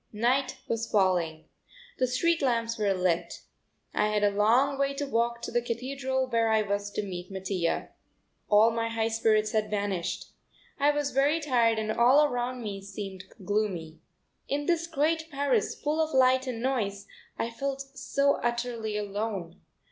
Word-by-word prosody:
Night 255 +5 +1
was 230 0 -2
falling. 175 -6 +1 0.5
The 255 - +3
street 330 +7 +1
lamps 230 -3 +1
were 205 -2 +2
lit. 180 -3 0 0.5
I 210 - +2
had 210 -1 0
a 205 - +4
long 240 +7 +3
way 275 0 +1
to 285 +1 -2
walk 235 -2 -1
to - - -4
the 240 - +1
Cathedral, 260 +2 -2
where 230 -3 +1
I 220 -1 +3
was 205 0 -2
to 210 - -2
meet 180 -2 -6
Mattia. 190 -3 -2 0.6
All 215 +2 +6
my 230 0 -1
high 225 0 0
spirits 215 -1 +2
had 215 -2 0
vanished. 200 -4 -2 0.5
I 285 +1 +4
was 290 -1 0
very 285 +5 +2
tired 240 -7 +2
and 215 0 -1
all 255 +7 +5
around 250 -2 -2
me 200 -2 -5
seemed 195 -1 -7 0.2
gloomy. 190 -6 -2 0.5
In 290 +1 -1
this 335 0 +1
great 320 +1 0
Paris 275 -7 0
full 305 +2 0
of 310 -3 -4
light 260 0 +4
and 235 -2 -4
noise 205 -7 -1 0.3
I 230 - -2
felt 275 +3 -3
so 280 +1 +1
utterly 235 -3 -2
alone. 205 -4 -4
230 Hz, 165 wpm, -28 LUFS, 205-270 Hz, 0.6 s, All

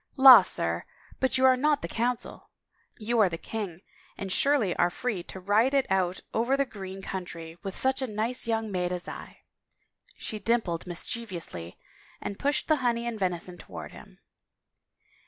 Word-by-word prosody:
" - - -42
La, 250 -5 +13
sir, 85 - +1 0.4
but 260 -1 +1
you 260 - +4
are 260 0 +7
not 290 +3 +1
the - - -2
Coimcil! 240 +1 -2 0.5
You 230 +1 -1
are 205 -4 +5
the 165 - -4
king 185 -1 -5 0.4
and 195 -1 -5
surely 240 -3 +2
are 175 - +3
free 215 0 -3
to 190 - -8
ride 215 +8 +2
it 275 - +3
out 185 -1 +1
over 240 +5 +1
the 275 - +2
green 195 -5 -8
country 170 -3 -6
with 195 -2 -5
such 265 +1 +3
a 260 - -1
nice 230 +3 -1
young 225 -2 -1
maid 180 -1 -1
as 180 -1 -4
I? - - -9 0.4
" - - -44 0.3
She 215 - -5
dim 235 +2 +2
pled 170 -3 -5
mischievously 175 - -4 0.4
and 200 - -6
pushed 285 +1 0
the 310 - +4
honey 235 -3 0
and 235 -2 -4
venison 180 -1 -2
towards - - -9
him. - - -14
215 Hz, 180 wpm, -28 LUFS, 180-245 Hz, 0.5 s, La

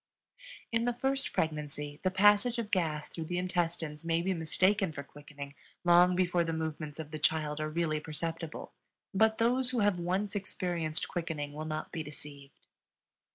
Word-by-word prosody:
In 230 0 +2
the 245 -1 +1
first 270 +2 0
pregnancy 150 -2 -2
the 185 - +2
passage 205 +5 +5
of 225 -2 -3
gas 155 -5 +1
through 165 - -6
the 175 +2 -2
intestines 170 -4 -1
may 165 0 +1
be 190 +1 +1
mistaken 185 +3 +2
for 140 -2 -6
quickening 145 0 -10 0.3
long 175 +1 +6
before 180 -1 +2
the 165 - -2
movements 155 -2 -3
of 155 -1 -6
the 155 - -4
child 150 -1 +1
are 155 - -1
really 155 -1 0
perceptible; 165 +1 -5 0.4
but 220 +2 +4
those 245 +2 +2
who 250 -3 0
have 205 -3 +3
once 185 +4 -1
experienced 175 -5 -2
quickening 160 -5 -3
will 155 +1 -5
not 155 0 -4
be 160 - -3
deceived. 145 -2 -10
165 Hz, 165 wpm, -32 LUFS, 155-190 Hz, 0.4 s, long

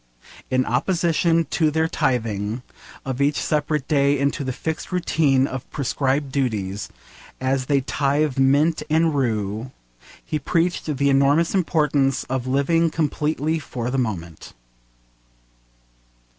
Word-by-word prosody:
In 130 0 +1
opposition 165 +4 +1
to 160 -2 +2
their 160 +1 +1
tithing 115 -6 -1 0.4
of 130 0 -3
each 145 +1 +2
separate 150 -2 -1
day 140 -1 +3
into 140 +1 0
the 130 - -2
fixed 160 +7 -4
routine 155 -7 +2
of 130 -2 -6
prescribed 140 0 -1
duties, 105 -8 -2 0.5
as 130 0 -1
they 140 -2 +2
tithe 140 +1 0
mint 145 +5 +3
and 160 +1 +3
rue, 110 -3 -1 0.6
he 155 - -2
preached 170 +5 0
the 140 +1 +2
enormous 140 +5 +3
importance 150 -7 +1
of 130 -1 -3
living 165 +5 +2
completely 155 0 -1
for 125 -4 -4
the 135 - 0
moment. 85 -9 -4
140 Hz, 120 wpm, -22 LUFS, 130-155 Hz, 0.6 s, day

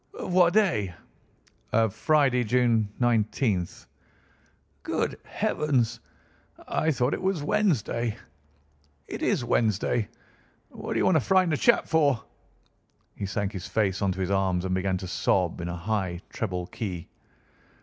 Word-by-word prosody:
"Of 180 - -4
what 175 -1 +5
day?" 110 - +2 0.8
"Of 110 -2 +2
Friday, 140 -5 +3
June 115 -2 +2
19th." 110 -5 0 1.0
"Good - - -2
heavens! 130 -7 0 0.7
I 160 - 0
thought 130 -3 +1
it - - -3
was 185 -5 0
Wednesday. 140 - 0 0.9
It - - -7
is 120 - +1
Wednesday. 110 -1 +1 0.6
What - - -5
d'you - - +2
want 180 - +4
to - - +2
frighten 185 +1 +3
a - - +3
chap 235 - +4
for?" 145 -7 +2 0.9
He 100 - -4
sank 100 0 -2
his 95 -3 -6
face 100 -3 0
onto 95 -1 0
his 95 +1 -1
arms 95 -2 +1
and 95 - -1
began 95 0 0
to 95 - -6
sob 90 -1 0
in 85 - -4
a 85 - -3
high 90 -1 -2
treble 90 -5 -3
key. 90 -4 -5
110 Hz, 140 wpm, -27 LUFS, 95-140 Hz, 1.0 s, what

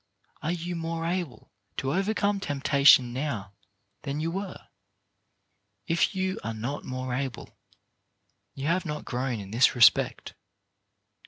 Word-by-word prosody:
Are 155 - -1
you 175 0 -3
more 165 0 -3
able 170 -9 -4 0.3
to 135 +1 -1
overcome 200 +1 +1
temptation 140 -6 +4
now 125 -8 -3 0.5
than 140 +1 -3
you 165 +2 -1
were? 195 +1 -6 1.2
If 170 +4 +1
you 190 0 -1
are 115 0 -3
not 120 +7 -4
more 130 0 -4
able, 130 -1 -4 1.0
you 135 - -5
have 170 +4 +1
not 150 -3 -5
grown 125 -2 -2
in 100 -1 -9
this 120 +4 +4
respect. 120 -2 +4
145 Hz, 130 wpm, -27 LUFS, 125-175 Hz, 1.2 s, temptation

